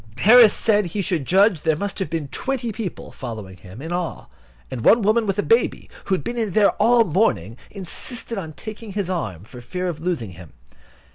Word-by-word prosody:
Harris 225 - +7
said 210 -3 +2
he 195 +4 -3
should 170 -6 -1
judge 190 - +3
there 160 -1 +2
must 200 +6 -4
have 190 - -2
been 160 -4 -3
twenty 255 - -3
people, 215 -4 -6
following 110 -8 -8
him, 95 - -12
in 165 - -6
all; 175 -1 -4 0.4
and 125 - -4
one 230 0 +5
woman 215 +2 +2
with 195 0 -1
a 205 - +1
baby, 460 - +1
who 190 - +1
had 150 - -5
been 225 - -2
there 210 0 +5
all 235 0 +5
the 175 - -7
morning, 115 - +1
insisted 215 +5 -4
on 165 -6 -6
taking 215 +3 -9
his 195 -2 -2
arm, 105 - -4
for 120 +3 -12
fear 180 +9 -4
of 165 -3 -4
losing 160 - -3
him. 85 -4 -13
185 Hz, 205 wpm, -22 LUFS, 150-215 Hz, 0.4 s, Harris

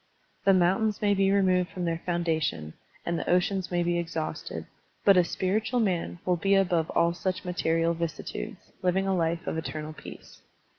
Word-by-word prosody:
The 195 - +6
mountains 195 +4 +2
may 205 -1 +4
be 195 0 +3
removed 185 -2 +3
from 180 -3 -4
their 165 0 -1
foundation, 160 - -1 0.3
and 170 -1 -1
the - - -4
oceans 180 +1 +1
may 175 -1 +1
be 175 0 +1
exhausted, 165 -2 -4 0.4
but 200 - +7
a 180 - +6
spiritual 215 +8 0
man 185 -6 0
will 180 -1 +2
be 195 +4 +2
above 175 -4 +2
all 170 0 +3
such 185 +2 -3
material 165 -1 +1
vicissitudes, 170 +5 -5
living 185 +1 +1
a 195 -1 +1
life 170 0 0
of 160 - -2
eternal 155 -1 -5
peace. - - -12
175 Hz, 170 wpm, -28 LUFS, 165-195 Hz, 0.4 s, but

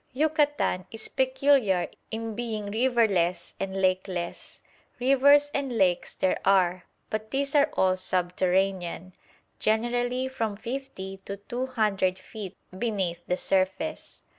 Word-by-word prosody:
Yucatan 295 - +1
is 225 -1 -5
peculiar 260 -7 +2 0.2
in 225 0 -4
being 215 -3 -4
riverless 215 -8 +1
and 195 0 -3
lakeless. 185 -2 -2 0.4
Rivers 285 +3 +5
and 270 -4 -1
lakes 180 -3 +1
there 185 - +1
are, 185 -2 +3 0.3
but 215 0 -3
these 275 +2 0
are 290 +1 +5
all 185 -1 +4
subterranean, 185 0 0 0.5
generally 245 +3 +1
from 225 -5 -2
fifty 230 -5 -6
to 200 - -5
two 240 +6 -4
hundred 205 -7 +1
feet 200 -2 -9 0.2
beneath 190 -6 -1
the 180 - 0
surface. 190 +14 -1
215 Hz, 115 wpm, -27 LUFS, 185-255 Hz, 0.5 s, Rivers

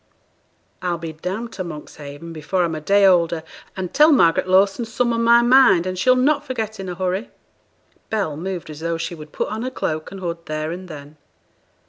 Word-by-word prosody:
'I'll 175 -2 -1
be 165 -1 -6
down 185 +9 -4
to 190 - -5
Monkshaven 150 -1 -9
before 165 +4 -1
I'm 165 -1 -1
a 155 - -5
day 200 +5 +4
older, 170 -3 +3 0.3
and 185 -2 -4
tell 305 +2 +6
Margaret 175 - +4
Lawson 195 +4 +3
some 235 +1 -1
on 230 0 0
my 235 +1 +6
mind 240 -8 +5
as 185 -1 -3
she'll 255 +5 +4
not 285 +3 +2
forget 220 -6 -4
in 190 -1 -5
a 180 - -5
hurry.' 185 +5 -2 0.8
Bell 200 -9 -1
moved 175 0 -5
as 150 - -9
though 165 +1 -2
she 165 +1 -4
would 155 -2 -11
put - - -3
on 215 +1 -4
her 255 - -2
cloak 155 -10 -3
and 195 - -9
hood 170 -2 -5
there 155 +1 -3
and 185 +2 -7
then. 150 -2 -11
185 Hz, 200 wpm, -21 LUFS, 165-220 Hz, 0.8 s, tell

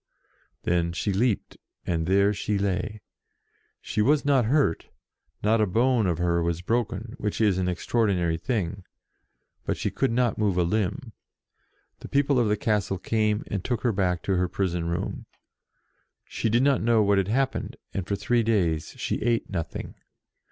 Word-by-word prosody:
Then 85 -1 +1
she 100 +4 -1
leaped, 110 +2 0 0.3
and 80 -2 -1
there 100 +2 +4
she 105 +1 -1
lay. 100 +2 -2 0.8
She 105 - -1
was 145 +6 +3
not 135 -4 +3
hurt, 135 - +1 0.6
not 110 +2 +3
a 105 - +3
bone 115 +2 +2
of 85 -3 0
her 85 -1 +1
was 85 +1 -2
broken, 115 +1 -1
which 105 -1 -2
is 100 -4 +3
an 90 - 0
extraordinary 90 -3 0
thing, 100 -6 -2 0.8
but - - -2
she - - -2
could - - 0
not 120 -1 +1
move 100 -4 +1
a 90 - +3
limb. 110 - -1 0.9
The - - -9
people 140 -1 +2
of 120 - +2
the 105 0 +1
castle 105 -3 0
came 105 +2 0
and 100 -3 -4
took 120 -2 -2
her 120 - +2
back 90 -3 0
to 95 -2 0
her 90 0 +1
prison 90 -3 -1
room. 85 - -3 1.0
She 115 - -2
did 120 +4 +3
not 140 -1 +3
know 115 -1 +3
what 100 -1 +3
had 95 - 0
happened, 130 +5 -1 0.2
and 95 -2 -3
for 100 - 0
three 115 +4 +1
days 90 -9 0
she - - -2
ate 115 -2 0
nothing. 85 -5 -4
105 Hz, 170 wpm, -26 LUFS, 90-115 Hz, 1.0 s, there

